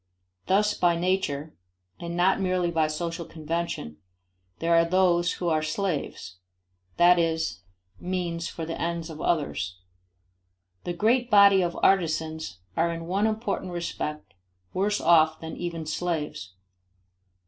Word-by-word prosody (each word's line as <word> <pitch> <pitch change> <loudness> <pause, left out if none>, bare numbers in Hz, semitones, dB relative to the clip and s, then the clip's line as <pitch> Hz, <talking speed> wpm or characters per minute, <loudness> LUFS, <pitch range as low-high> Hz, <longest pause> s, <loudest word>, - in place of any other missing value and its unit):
Thus 210 +2 +3
by 175 -1 +2
nature, 170 -4 -1 0.5
and 170 0 -5
not 190 +2 +3
merely 180 -2 +1
by 160 -2 +2
social 165 +2 -3
convention, 160 - -4 0.6
there 170 +1 +1
are 165 0 +6
those 175 0 +2
who 175 - -4
are 155 -1 +2
slaves 155 - -3 0.6
that 175 0 +6
is, 160 - -1 0.4
means 175 -2 -3
for 165 - -6
the 165 - -5
ends 170 -1 -2
of 155 - -8
others. 120 - -1 1.1
1 175 - -2
The 175 - -7
great 240 +6 +2
body 200 -3 +7
of 175 -1 -2
artisans 160 - +1 0.2
are 170 +1 +2
in 165 0 -5
one 195 +5 +1
important 215 -4 -2
respect 150 -3 -4 0.4
worse 205 +3 +1
off 160 -2 +4
than 160 0 -7
even 170 -2 -4
slaves. 150 - -3
170 Hz, 135 wpm, -26 LUFS, 160-185 Hz, 1.1 s, body